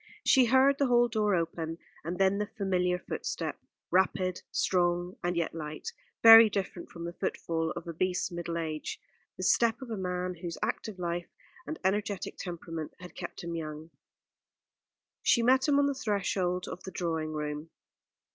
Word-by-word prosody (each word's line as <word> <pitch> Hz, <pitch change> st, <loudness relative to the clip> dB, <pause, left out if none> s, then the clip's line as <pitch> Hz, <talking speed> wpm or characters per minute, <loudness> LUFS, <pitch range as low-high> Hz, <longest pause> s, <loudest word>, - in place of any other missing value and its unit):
She 260 Hz, -3 st, +6 dB
heard 265 Hz, +3 st, +4 dB
the 280 Hz, -, +3 dB
hall 240 Hz, -1 st, +5 dB
door 215 Hz, -3 st, +1 dB
open, 165 Hz, -1 st, -2 dB, 0.3 s
and 170 Hz, +3 st, -3 dB
then 195 Hz, +1 st, +3 dB
the 210 Hz, -, -1 dB
familiar 180 Hz, -4 st, 0 dB
footstep, -, -, -4 dB, 0.3 s
rapid, 185 Hz, 0 st, +2 dB
strong, 175 Hz, 0 st, +1 dB
and 175 Hz, 0 st, 0 dB
yet 170 Hz, -, 0 dB
light, 155 Hz, -1 st, -5 dB, 0.3 s
very 225 Hz, -1 st, +11 dB
different 195 Hz, -3 st, -4 dB
from 170 Hz, -1 st, -8 dB
the 170 Hz, -, -5 dB
footfall 165 Hz, -2 st, -2 dB
of 170 Hz, -, -6 dB
obese 180 Hz, +3 st, -1 dB
middle 170 Hz, -1 st, -4 dB
age; 155 Hz, -2 st, -4 dB, 0.4 s
the 185 Hz, -, -5 dB
step 230 Hz, +4 st, +3 dB
of 260 Hz, -3 st, -8 dB
a 220 Hz, -, -2 dB
man 180 Hz, -1 st, -2 dB
whose 170 Hz, 0 st, -5 dB
active 215 Hz, -4 st, -3 dB
life 175 Hz, -1 st, -3 dB, 0.4 s
and 315 Hz, -, -4 dB
energetic 200 Hz, +1 st, -1 dB
temperament 165 Hz, -3 st, -6 dB
had 180 Hz, -1 st, -10 dB
kept 175 Hz, -, -7 dB
him 170 Hz, 0 st, -4 dB
young. 155 Hz, 0 st, -6 dB, 1.3 s
She 235 Hz, -, +4 dB
met 260 Hz, +3 st, +4 dB
him 285 Hz, -1 st, +4 dB
on 285 Hz, -, +4 dB
the 280 Hz, -, +1 dB
threshold 190 Hz, -6 st, -1 dB
of 180 Hz, -, -7 dB
the -, -, -7 dB
drawing 160 Hz, -3 st, -2 dB
room. 150 Hz, +1 st, -4 dB
180 Hz, 165 wpm, -30 LUFS, 170-210 Hz, 1.3 s, very